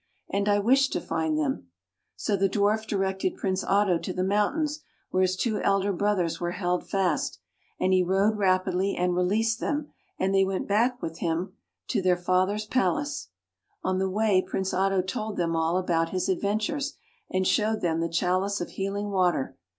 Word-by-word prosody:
And 200 +1 +1
I 205 - +4
wish 260 +6 +4
to - - -2
find 160 -1 -1
them." 140 - -1 0.5
So 210 - -1
the 195 0 +2
Dwarf 210 +2 +1
directed 190 -2 -1
Prince 190 -1 -1
Otto 195 -4 +2
to 185 - -4
the 185 - -1
mountains 285 - +1 0.3
where 185 - +2
his 185 0 +2
two 215 +2 -1
elder 195 0 +2
brothers 185 -3 0
were 175 0 -1
held 180 -1 -2
fast, 195 -2 0 0.4
and 185 - +2
he 185 - +5
rode 195 +4 +2
rapidly, 185 -1 +1
and 180 0 0
released 220 +6 +1
them; 295 +2 -2 0.3
and 190 +1 0
they 195 0 +5
went 190 0 -1 0.4
with 165 0 -5
him 170 +1 0
back 185 - -21 0.4
to - - +1
their 180 -1 +3
father's 185 +4 +1
palace. 285 - 0 0.6
On 185 0 0
the 190 0 0
way 205 -1 +3
Prince 190 0 -3
Otto 190 0 +2
told 215 +3 -4
them 165 -1 0
all 165 +2 +1
about 165 -3 +1
his 185 +2 -1
adventure, 210 - 0 0.5
and 185 0 0
showed 215 0 +1
them 165 -2 0
the 165 0 -1
chalice 185 +4 0
of 175 - -4
healing 200 +1 -3
water. 180 -8 +1
190 Hz, 180 wpm, -27 LUFS, 180-205 Hz, 0.6 s, he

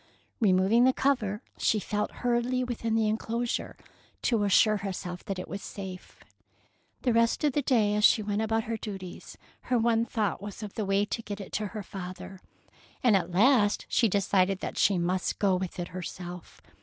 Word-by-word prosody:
" - - -42
Removing 200 +4 +4
the 260 - +5
cover, 235 -6 0 0.2
she 215 - +2
felt 210 +1 -2 0.2
hurriedly 245 +1 +1
within 230 -2 -2
the 220 -1 +2
enclosure 230 +2 -2 0.5
to 225 -4 +2
assure 215 +2 +4
herself 185 -2 -5
that 195 - -3
it 180 - -6
was 195 +4 -6
safe. 190 -2 -9 0.8
The 245 - +2
rest 230 +5 +2
of 295 -3 +2
that 290 -1 -1
day, 215 -5 +3
as 210 0 0
she 215 - +6
went 205 +1 -1
about 225 0 0
her 225 +1 -3
duties, 195 -5 -8 0.3
her 250 - +3
one 230 0 +2
thought 210 -7 -1
was 205 +1 -7
of 205 - -7
the 215 - -2
way 195 +1 +2
to 230 - -4
get 205 -2 -6
it 195 - -8
to 210 0 -1
her 210 0 -6
father, 185 0 -8 0.6
and 235 -5 +5
at 190 - +1
last 205 +3 +3
she 230 - +3
decided 195 -1 +2
that - - -4
she 200 - +3
must 180 +1 -1
go 195 -3 +2
with 185 -1 -4
it 175 -1 -4
herself. 180 -1 -8
210 Hz, 190 wpm, -28 LUFS, 190-230 Hz, 0.8 s, she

